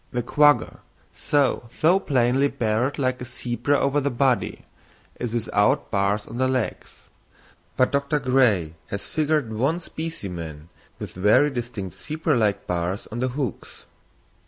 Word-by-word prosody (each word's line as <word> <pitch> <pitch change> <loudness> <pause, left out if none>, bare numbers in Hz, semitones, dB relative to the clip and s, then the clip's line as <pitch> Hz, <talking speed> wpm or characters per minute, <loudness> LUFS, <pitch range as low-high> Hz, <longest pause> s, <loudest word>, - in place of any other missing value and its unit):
The 120 -1 -2
quagga, 145 +4 +3 0.5
though 135 -5 +2
so 175 +5 +5
plainly 135 -3 +2
barred 120 +2 -1
like 130 -2 -1
a - - -4
zebra 125 +3 -1
over 140 +1 +1
the 140 - 0
body, 125 -3 0 0.5
is 120 -2 -3
without 110 -3 +1
bars 100 +1 +1
on 120 - -7
the 130 - +3
legs; 130 -3 -3 0.7
but 130 - +3
Dr. 140 +2 +1
Gray 125 - +2
has 100 0 -5
figured 150 -6 0
one 135 +10 +1
specimen 90 - -6 0.3
with - - -7
very 105 +10 +4
distinct 120 -7 -5
zebra 155 0 -1
like 105 -4 +1
bars 90 +2 -2
on 120 - -4
the 130 - +1
hocks. 130 -5 -5
125 Hz, 140 wpm, -24 LUFS, 105-140 Hz, 0.7 s, so